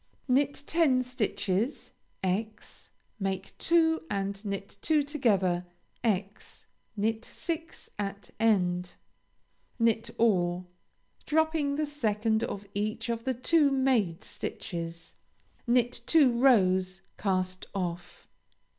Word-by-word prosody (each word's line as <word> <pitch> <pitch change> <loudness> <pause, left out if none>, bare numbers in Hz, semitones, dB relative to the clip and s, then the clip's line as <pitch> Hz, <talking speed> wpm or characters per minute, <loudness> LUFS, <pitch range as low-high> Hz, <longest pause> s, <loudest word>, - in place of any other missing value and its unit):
Knit 275 +2 +2
ten 285 -7 +3
stitches, 225 -1 -1 0.3
× 210 +4 -3 0.3
make 195 -1 -3
two 325 -1 +3
and 195 0 -2
knit 200 -1 -5
two 310 -2 +3
together; 200 -12 +1 0.4
× 205 -2 -2 0.3
knit 220 +2 0
six 330 +3 -5
at 200 0 -4
end. 180 -5 +2 0.8
Knit 230 -1 +2
all, 180 -5 +2 0.6
dropping 315 -2 +2
the 305 +1 0
second 220 -6 0
of 205 -3 -4
each 215 +3 -2
of 230 -1 -2
the 260 - +1
two 290 +4 +4
made 255 -11 +1
stitches. 170 -1 -6 0.5
Knit 240 0 +2
two 295 -6 +6
rows; 190 -7 +3 0.2
cast 185 -2 -1
off. 175 -2 -4
220 Hz, 100 wpm, -29 LUFS, 190-265 Hz, 0.8 s, two